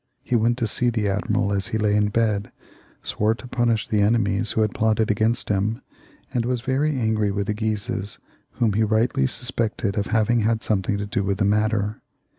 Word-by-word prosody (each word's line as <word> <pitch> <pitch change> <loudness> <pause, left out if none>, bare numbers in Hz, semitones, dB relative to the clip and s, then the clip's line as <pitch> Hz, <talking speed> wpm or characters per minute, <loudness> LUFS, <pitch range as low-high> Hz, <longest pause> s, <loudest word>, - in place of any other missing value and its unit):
He 125 - -1
went 120 +1 +2
to 120 - 0
see 120 +3 0
the 110 -3 -1
admiral 100 +1 0
as 100 -1 -1
he 110 - -2
lay 105 -1 +1
in 105 0 +3
bed, 105 -2 0 0.5
swore 110 +2 0
to 125 - -11
punish 120 -3 0
the 105 -1 +1
enemies 105 0 +1
who 110 - +1
had 105 -1 +1
plotted 110 0 +1
against 110 +3 0
him, 105 +3 0 0.5
and 120 - +1
was 125 0 -1
very 135 +2 0
angry 110 -2 +1
with 100 0 -1
the 105 - -1
Guises, 105 -2 -3 0.4
whom 115 -4 +1
he 110 - +1
rightly 110 - +2
suspected 115 - -2
of 100 - -2
having 115 +1 +2
had 110 +1 +1
something 100 -1 0
to 100 - -3
do 100 0 -1
with 100 0 -1
the 100 - +1
matter. 105 0 0
110 Hz, 200 wpm, -23 LUFS, 105-115 Hz, 0.5 s, in